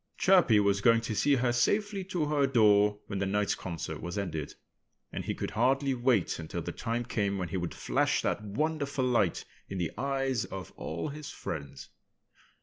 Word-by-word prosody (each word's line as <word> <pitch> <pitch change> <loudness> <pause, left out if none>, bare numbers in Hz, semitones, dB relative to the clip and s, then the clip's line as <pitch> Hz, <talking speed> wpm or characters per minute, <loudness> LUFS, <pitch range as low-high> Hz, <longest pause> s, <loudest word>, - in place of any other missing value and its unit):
Chirpy 180 - +5
was 100 -1 +2
going 115 +1 +5
to 115 -1 -3
see 145 +6 +3
her 125 -2 +1
safely 205 - +1
to 180 -4 -1
her 145 -2 +2
door 105 -4 +4
when 100 -2 -4
the 100 - 0
night's 105 0 +1
concert 85 -3 -5
was 85 +3 -5
ended. 80 -7 -4 0.6
And - - -5
he - - -2
could - - -4
hardly 135 +4 +2
wait 120 -9 +1
until 80 -1 -5
the - - -4
time 120 +1 -3
came 100 -4 -1
when 90 -3 -3
he 95 - -2
would 85 -1 -3
flash - - +1
that - - 0
wonderful 140 +4 -1
light 115 -8 +1 0.2
in 95 - -4
the 85 -3 -1
eyes 135 -3 0
of 95 -1 -8
all 85 - -4
his 150 0 -7
friends. 70 -4 -7
115 Hz, 185 wpm, -30 LUFS, 95-135 Hz, 0.6 s, Chirpy